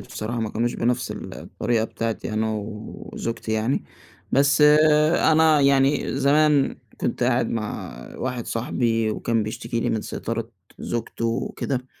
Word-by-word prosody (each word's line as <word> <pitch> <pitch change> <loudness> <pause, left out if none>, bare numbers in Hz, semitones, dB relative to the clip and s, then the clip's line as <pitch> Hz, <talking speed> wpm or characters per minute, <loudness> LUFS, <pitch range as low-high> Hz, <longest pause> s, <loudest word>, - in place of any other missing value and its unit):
بصراحة 115 +2 -5
ما 110 -1 -2
كانوش 120 +2 -1
بنَفْس 120 +1 0
ال - - -7
الطريقة 115 -1 -1
بتاعتي 115 -1 -4
أنا 110 +1 0
وزوجتي 110 +2 -5
يعني. 110 +5 0 0.5
بس 140 +2 +4 0.7
أنا 160 -1 +5
يعني 140 0 +3
زمان 145 0 +3 0.2
كنت 120 - -1
قاعد 120 -1 +2
مع 110 -2 -4 0.2
واحد 125 -2 -3
صاحبي، 115 -1 0
وكان 115 +1 0
بيشتكي 115 +2 -3
لي - - 0
من 110 - 0
سيطرة - - -4 0.3
زوجته 115 0 -3
وكده. 125 +2 -2
120 Hz, 130 wpm, -23 LUFS, 110-135 Hz, 0.7 s, أنا